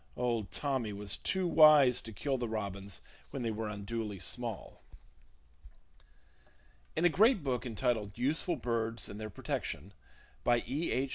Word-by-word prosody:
Old 120 -4 0
"Tommy" 130 -7 -2
was 100 -1 0
too 190 -1 0
wise 150 -6 +7
to 115 - -8
kill 135 +6 -1
the 120 -2 -2
robins 100 -3 -4 0.3
when 135 - -4
they 115 - 0
were 110 0 -3
unduly 105 0 -4
small. 115 +3 -4 2.1
In 165 - +2
a - - +9
great 205 - +4
book 130 -2 -1
entitled 110 -3 -1
Useful 155 +7 +1
Birds 115 -3 -2
and 105 - -7
Their 110 - -4
Protection, 95 -2 -4 0.5
by 120 -1 +3
E. 145 +7 -1
H. 135 +1 0
120 Hz, 145 wpm, -33 LUFS, 105-135 Hz, 2.1 s, a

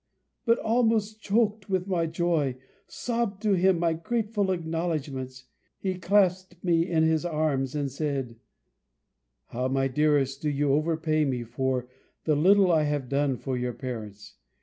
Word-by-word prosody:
But, 230 - +5
almost 220 -2 +1
chok'd 215 -1 +1
with 185 -2 0
my 170 -4 0
joy, 160 -5 0 0.3
sobb'd 230 -5 -2
to 210 -2 +3
him 190 0 +3
my 165 -1 +1
grateful 210 +3 -1
acknowledgments. 155 -7 -3 0.3
He 190 -1 -2
clasped 185 -1 +2
me 170 -1 +2
in 160 -2 +2
his 160 0 +2
arms, 150 -5 -1
and 140 -2 -1
said, 135 -4 -3 1.1
"How, 125 +2 -2
my 135 0 +1
dearest, 140 0 +1
do 150 - 0
you 145 -1 +1
overpay 155 0 +1
me 125 -3 -1
for 125 +1 -2 0.4
the 155 - +2
little 190 +4 +5
I 160 -2 +4
have 145 -4 -2
done 140 -2 +1
for 130 +3 -3
your 125 0 -2
parents! 110 -5 -7
160 Hz, 150 wpm, -27 LUFS, 135-185 Hz, 1.1 s, But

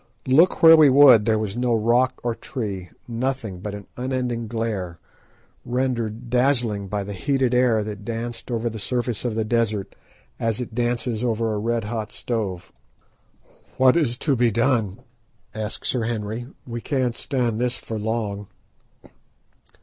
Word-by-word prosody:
Look 155 +9 +4
where 165 0 +10
we 155 -3 +7
would 130 -5 +7
there 110 -1 +3
was 105 -2 -3
no 120 -1 +1
rock 120 +4 +2
or 120 -1 0
tree, 100 -8 -5 0.2
nothing 120 -5 -3
but 100 +2 -5
an 100 -1 -9
unending 125 -2 -2
glare, 105 -6 -3 0.7
rendered 120 -2 -2
dazzling 120 -5 +1
by 100 +1 -2
the 100 +1 -6
heated 130 +5 0
air 125 -3 +3
that 105 -1 -7
danced 115 +3 -5
over 120 -1 -1
the 110 -1 -4
surface 120 0 -2
of 115 -3 -1
the 110 -1 0
desert 110 -3 -1 0.4
as 115 -1 -1
it 125 -3 -5
dances 120 -1 -1
over 115 -2 0
a 105 - -2
red 115 +1 -1
hot 110 0 -4
stove. 100 -7 -4 1.1
"What 130 -1 +5
is 135 -8 +1
to 145 -4 +3
be 120 -1 +3
done?" 115 -3 0 0.5
asked 110 0 -5
Sir 120 -3 0
Henry; 115 +1 -3 0.2
"we 120 -1 -5
can't 130 -4 -1
stand 120 -5 -1
this 125 0 +1
for 110 -1 -6
long." 105 -2 -3
115 Hz, 155 wpm, -23 LUFS, 110-125 Hz, 1.1 s, where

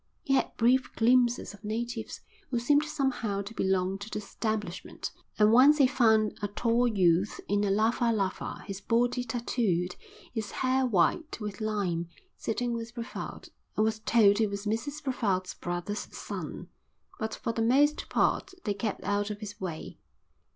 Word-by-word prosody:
He 270 - 0
had 270 - +1
brief 250 +2 +3
glimpses 240 -1 +3
of 205 - -15
natives 225 +2 -4 0.3
who 245 - 0
seemed 290 +5 +3
somehow 250 -9 -1
to 205 +3 -8
belong 190 -1 0
to 200 +2 -7
the - - -4
establishment, 210 -2 -4 0.3
and 210 0 +5
once 270 +6 +7
he 280 - +6
found 220 -4 +3
a 205 - 0
tall 235 +4 +1
youth 185 -3 +2
in 205 +1 +1
a 205 - +1
lava 225 +4 +2
lava, 195 -4 -2
his 195 0 -6
body 245 +3 +1
tattooed, 225 -7 -1 0.4
his 220 -4 -3
hair 260 0 +1
white 235 - +1
with 210 0 -5
lime, 195 -6 -1 0.3
sitting 240 +2 -2
with 230 0 -5
Brevald, 235 0 -6 0.3
and 215 - +4
was 220 0 0
told 215 -2 +4
he 220 - +3
was 200 +1 -5
Mrs 245 +8 -2
Brevald's 200 -9 -1
brother's 175 +4 -4
son; - - -6 0.5
but 220 -2 -2
for 230 - -3
the 225 - -1
most 280 +6 +3
part - - +1
they 205 - 0
kept 205 +1 -3
out 205 +1 0
of 210 -1 -5
his 205 -2 -8
way. 170 -4 -6
220 Hz, 165 wpm, -29 LUFS, 200-240 Hz, 0.5 s, once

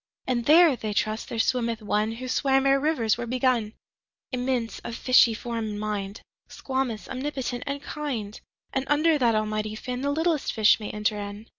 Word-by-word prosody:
19And 240 -2 0
there 320 -1 +7
(they 215 -3 -4
trust) 215 +2 -1
there 235 - -4
swimmeth 235 -1 0
One20Who 220 +3 -2
swam 270 +1 +2
ere 275 0 +4
rivers 255 -7 +1
were 240 - -4
begun,21Immense, 250 0 -3
of 235 - -5
fishy 245 -3 +5
form 230 0 -4
and 205 0 -5
mind,22Squamous, 215 +4 -4
omnipotent, 260 -2 -4
and 280 0 -3
kind;23And 265 -2 -5
under 305 +1 +3
that 235 -3 +3
Almighty 215 0 -1
Fin,24The 255 +5 -3
littlest 320 -3 0
fish 220 0 +5
may 210 - -5
enter 210 0 -1
in. 205 +1 -7
240 Hz, 150 wpm, -26 LUFS, 215-270 Hz, -, there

